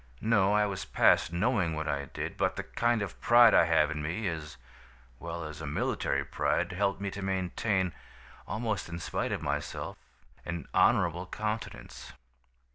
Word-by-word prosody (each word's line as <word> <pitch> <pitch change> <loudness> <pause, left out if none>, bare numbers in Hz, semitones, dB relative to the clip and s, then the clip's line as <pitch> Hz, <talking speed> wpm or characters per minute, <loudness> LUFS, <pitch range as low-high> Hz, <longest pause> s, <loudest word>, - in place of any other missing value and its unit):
No, 105 -3 +3
I 105 0 +4
was 95 -3 -3
past 80 - +3
knowing 90 -2 +1
what 80 0 -3
I 70 -1 -1
did; - - -5
but - - 0
the - - -4
kind 120 -2 0
of 100 - -8
pride 120 -1 +7
I - - +6
have 80 -2 +3
in 75 -1 -3
me, 90 +8 -2
as 80 -3 -5 0.6
well 85 0 -5
as 75 -1 -8
a - - -5
military 70 +1 -1
pride, 90 +5 0
helped 100 +1 0
me 100 -1 -3
to 100 - -6
maintain, 95 0 -1 0.5
almost 110 -5 -2
in 85 - -5
spite 85 - -3
of - - -3
myself, - - -3 0.5
an 85 -4 -5
honorable 85 +2 +3
countenance. 110 +3 -5
90 Hz, 165 wpm, -30 LUFS, 80-105 Hz, 0.6 s, pride